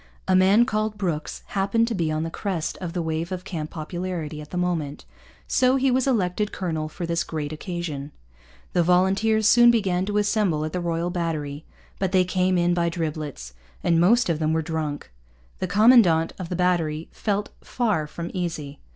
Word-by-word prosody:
A 190 - +3
man 195 +5 +5
called 215 -3 -1
Brooks 170 -7 -3
happened 200 +4 +1
to 235 - -2
be 165 -6 0
on 155 0 -1
the 165 - -4
crest 180 -4 -3
of 175 -3 -5
the 175 -2 -2
wave 160 +2 -3
of 185 -1 -4
camp 165 -5 -5
popularity 165 -1 -5
at 150 - -11
the 180 - -5
moment; 165 -5 -2 0.4
so 255 0 +3
he 270 0 +2
was 260 +1 +1
elected 210 -4 0
colonel 160 -4 -3
for 175 +2 -5
this 170 0 0
great 155 -1 -4
occasion. 155 -4 -5 0.6
The 175 - +3
volunteers 195 +5 +3
soon 240 +2 +7
began 190 -5 +1
to 205 0 -1
assemble 205 -7 +1
at 155 - -5
the 180 - -2
Royal 170 0 -1
Battery. 155 -4 -3 0.3
But 190 -1 -1
they 185 -1 +4
came 185 0 +1
in 175 0 +2
by 170 -1 +1
driblets, 155 - -4 0.3
and 165 -1 +3
most 235 +7 +4
of 165 -3 0
them 155 0 +1
were 160 0 0
drunk. 155 - -4 0.5
The - - -1
commandant 205 -7 +5
of 180 -3 -5
the 180 - -2
battery 165 -3 0
felt 205 -1 -2
far 210 -11 0
from 170 +3 -6
easy. 160 -6 -4
175 Hz, 185 wpm, -24 LUFS, 160-200 Hz, 0.6 s, soon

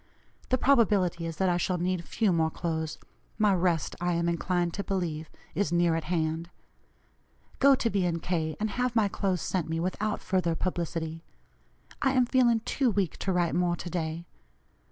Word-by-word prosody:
The 255 - +3
probability 205 -11 +3
is 165 -2 -6
that 190 - +2
I 175 -1 +2
shall 180 +1 0
need 180 0 -1
few 205 +1 +1
more 160 -1 +2
clothes; 160 -2 -3 0.4
my 210 -2 +4
rest, 175 -4 +1
I 175 0 +1
am 170 0 0
inclined 175 0 0
to 200 - -3
believe, 165 -6 -3 0.2
is 175 -1 0
near 175 -1 +3
at 165 -1 -2
hand. 165 0 -1 1.1
Go 275 0 +7
to 245 - 0
B. 195 -5 +1
& - - -19
K., 160 -4 -1
and 215 0 -1
have 250 +2 -1
my 220 -3 +4
clothes 190 -3 -1
sent 180 -4 -2
me 165 0 -1
without 200 +5 -1
further 185 -3 0
publicity. 165 -2 -3 0.8
I 270 -1 +3
am 255 -2 +4
feeling 240 -2 +3
too 260 +3 +1
weak 195 -7 -1
to 195 - -1
write 175 -2 +1
more 175 -1 +1
to 175 - -7
day. 165 -1 -3
180 Hz, 180 wpm, -28 LUFS, 165-205 Hz, 1.1 s, Go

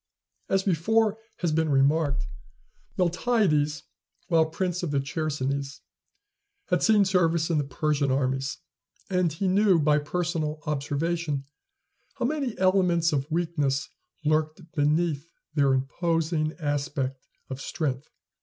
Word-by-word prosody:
As 195 0 +2
before 215 +5 +2 0.2
has 170 -3 +1
been 160 0 +1
remarked, 140 +1 +2 0.7
Miltiades, 175 -5 +1 0.5
while 165 -2 +4
prince 180 +2 -2
of 175 - -2
the 140 -1 +1
Chersonese, 140 -1 -3 0.9
had 180 -1 +2
seen 210 -2 +5
service 170 -3 +2
in 155 - +2
the - - +1
Persian 140 +1 0
armies; 135 0 0 0.5
and 180 -3 +2
he 175 +6 -2
knew 195 0 +4
by 150 0 +3
personal 160 0 -2
observation 150 +1 -1 0.7
how 255 -3 -1
many 275 -4 -1
elements 180 -3 +3
of 140 +1 -1
weakness 155 -5 0 0.4
lurked 155 +2 0
beneath 150 +1 0 0.2
their 140 -3 +3
imposing 155 +3 0
aspect 145 -3 -2 0.3
of 130 +1 -5
strength. 140 -4 -3
155 Hz, 115 wpm, -26 LUFS, 145-175 Hz, 0.9 s, seen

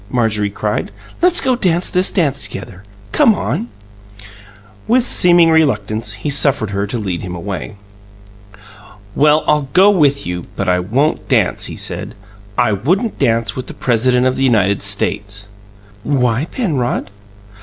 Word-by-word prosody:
Marjorie 110 -4 0
cried. 105 +1 -3 0.3
"Let's 355 0 +4
go 260 -1 +1
dance 180 -6 +1
this 180 +1 +3
together. 140 - -2 0.3
Come 220 - +4
on!" 120 - -3 1.2
With 245 +2 +3
seeming 175 -6 +4
reluctance, 115 -9 0
he 110 +8 -4
suffered 140 -7 +2
her 100 +1 -2
to 120 - -4
lead 95 -6 -3
him 90 -1 -6
away. 90 -7 -6 1.4
"Well, 150 +4 +3
I'll 150 -3 +1
go 195 +3 +6
with 145 -7 +2
you; 90 0 -4
but 100 - -3
I 90 0 +2
won't 125 +12 -1
dance," - - +2
he - - -5
said - - -5 0.4
"I 120 -3 +2
wouldn't 180 - -1
dance 115 -4 +1
with 130 -1 -6
the - - -9
President 125 +1 +1
of 130 0 +1
the 135 - 0
United 100 -6 +2
States" 100 0 -2 0.5
"Why, 125 0 0
Penrod?" 150 - -2
125 Hz, 145 wpm, -16 LUFS, 105-155 Hz, 1.4 s, go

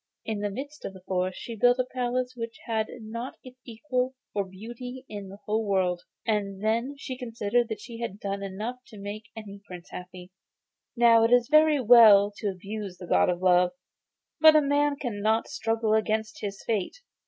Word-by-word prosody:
In 220 -2 -2
the 205 0 -1
midst 285 +8 -7
of 195 - -5
this 190 -1 -14
forest 185 0 -1
she 230 - -7
built 245 +3 +4
a 255 - +1
palace 250 0 -2
which 230 0 -6
had 220 -2 -1
not 230 +4 -6
its 255 0 -13
equal 250 +2 -2 0.2
for 200 - 0
beauty 240 +7 -9
in 205 -2 -7
the 195 - -10
whole 215 +1 0
world, 185 -4 0 0.2
and 200 -2 -1
then 230 +6 0
she 265 -2 -6
considered 235 -1 -1
that 220 - -4
she 230 -1 -9
had 220 -4 -5
done 200 -1 -3
enough 210 +6 -4
to 215 - -12
make 205 +2 -7
any 200 -2 -9
prince 180 -3 -11
happy. 180 0 -9 0.7
Now 230 -1 +6
it 230 - +3
is 245 +2 +4
all 305 - +10
very 310 -2 +3
well 220 -4 +7
to 210 - -3
abuse 195 0 -6
the 180 - -9
God - - +3
of 180 +1 -2
Love, 180 -1 +4 0.7
but 315 0 +8
a 305 - +7
man 285 +1 +2
cannot 220 -4 -1
struggle 225 -1 -1
against 220 0 0
his 200 -1 -5
fate. 225 - -2
220 Hz, 190 wpm, -27 LUFS, 200-245 Hz, 0.7 s, all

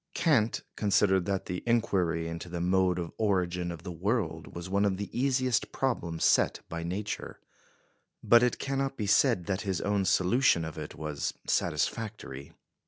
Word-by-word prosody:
Kant 120 -10 +2
considered 95 -2 +2
that 100 -1 -1
the 90 0 -4
inquiry 95 -8 +1
into 85 +1 -6
the 85 0 -4
mode 90 0 +2
of 85 -2 -4
origin 90 -4 0
of 85 -1 -8
the 90 - -5
world 85 -2 -2
was 85 +1 -6
one 100 +2 +1
of 100 -2 +1
the 100 0 -6
easiest 130 -1 +1
problems 85 -11 -1
set - - +3
by 85 0 -4
Nature; 95 +5 -4 0.8
but 120 0 +6
it 125 -1 +2
cannot 135 0 -2
be 105 - -2
said 105 -2 +3
that 100 0 -1
his 95 -3 -2
own 100 -1 0
solution 95 -1 +3
of 80 - -7
it 75 -1 -7
was 75 -2 -3
satisfactory. 105 -12 -2
95 Hz, 165 wpm, -29 LUFS, 85-110 Hz, 0.8 s, but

